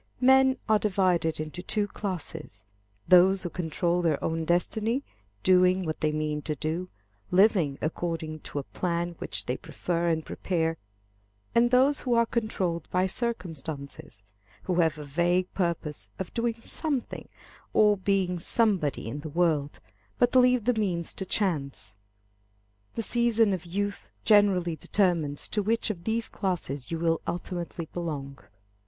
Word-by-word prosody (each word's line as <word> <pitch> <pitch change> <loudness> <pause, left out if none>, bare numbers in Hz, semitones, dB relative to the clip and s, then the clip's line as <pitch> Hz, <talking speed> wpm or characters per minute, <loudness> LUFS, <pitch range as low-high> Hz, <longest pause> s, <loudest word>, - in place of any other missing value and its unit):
Men 265 +1 +5
are 215 -1 +4
divided 180 -6 +1
into 155 +3 -5
two 205 +3 0
classes, 165 - -6 0.4
those 185 +1 +6
who 175 - -4
control 175 +1 0
their 160 -4 +2
own 165 0 -1
destiny, 220 - +1 0.4
doing 185 0 +4
what 155 -1 -4
they 155 0 +2
mean 150 0 -2
to 150 0 -3
do, 165 +5 -3 0.4
living 180 -7 +4
according 160 0 -3
to 145 - -8
a 140 - -1
plan 175 +2 -2
which - - -3
they 125 - -2
prefer 170 -1 -2
and 160 -1 0
prepare, 165 -3 -1 0.8
and 235 +1 +4
those 260 +3 +4
who 245 -2 0
are 235 0 +4
controlled 190 -8 -2
by 185 +1 +2
circumstances, 160 - -5 0.4
who 180 -1 0
have 160 -3 +2
a 150 - -7
vague 175 +5 +1
purpose 170 -5 -2
of 190 - -6
doing 230 -1 -1
something 285 -7 -3 0.4
or 210 -1 +5
being 190 -2 0
somebody 185 - +1
in 120 +6 -4
the 155 +1 -6
world, 155 -3 0 0.4
but 245 +1 +2
leave 250 -3 +5
the 250 - +3
means 185 -7 -1
to 190 - -4
chance. 155 - -2 1.0
The 230 - -2
season 230 -3 +2
of 180 -3 -4
youth 200 +3 -3 0.2
generally 195 -5 +4
determines 165 -6 +1
to 210 - 0
which 225 +2 0
of 170 -4 -9
these 225 +1 0
classes 150 - -3
you 165 - -2
will 165 0 +1
ultimately 175 -2 -4
belong. 145 -5 -4
180 Hz, 145 wpm, -27 LUFS, 160-210 Hz, 1.0 s, those